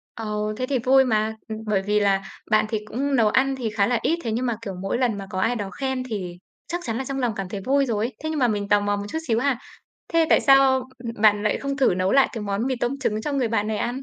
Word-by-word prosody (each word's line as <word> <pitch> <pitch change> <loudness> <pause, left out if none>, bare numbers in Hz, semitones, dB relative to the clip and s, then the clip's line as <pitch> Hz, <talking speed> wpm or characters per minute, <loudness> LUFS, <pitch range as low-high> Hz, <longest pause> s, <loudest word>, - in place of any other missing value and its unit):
Ồ, 210 -1 -3
thế 255 - -1
thì 265 -2 0
vui 265 +2 +4
mà! 220 -2 0
Ừm, 220 - -5
bởi 210 -3 +1
vì 210 +2 +1
là 195 -1 +2 0.3
bạn 215 0 +4
thì 220 - -1
cũng 275 +6 -1
nấu 225 -4 +4
ăn 270 +4 +2
thì 245 -4 -3
khá 210 -2 +1
là 240 -1 +1
ít, 335 +2 +1
thế 230 - -2
nhưng 240 +4 -1
mà, 240 -2 0
kiểu, 200 -4 -5
mỗi 195 +5 -1
lần 240 -4 +1
mà 195 -1 -7
có 185 - -3
ai 240 +5 +1
đó 205 -4 -4
khen 265 -2 -2
thì 195 -8 -5 0.3
chắc 345 +1 -3
chắn 225 -1 -3
là 265 - -3
trong 270 +1 -3
lòng 245 -3 0
cảm 195 -2 -4
thấy 195 0 -5
vui 275 +1 +3
rồi 220 -3 -1
ấy. 250 - -6
Thế 315 - -2
nhưng 315 -1 -2
mà 250 - +4
mình 205 -3 -1
tò 205 - +5
mò 205 0 0
một 205 0 -4
chút 320 - -3
xíu 225 -2 +2
ha, 260 -1 0 0.5
thế 330 -1 +4
tại - - +6
sao, 270 -2 +5
ưm, 235 -2 -5
bạn 210 -1 +5
lại 210 - +1
không 275 0 -3
thử 265 -9 +3
nấu 185 +1 0
lại 275 -1 +5
cái 225 - -5
món 200 +3 -2
mì 260 -1 -1
tôm 245 +3 -2
trứng 215 -5 -1
cho 295 - -2
người 265 -4 +1
bạn 215 -2 0
này 215 0 -1
ăn? 250 +3 -3
230 Hz, 300 wpm, -23 LUFS, 210-265 Hz, 0.5 s, tại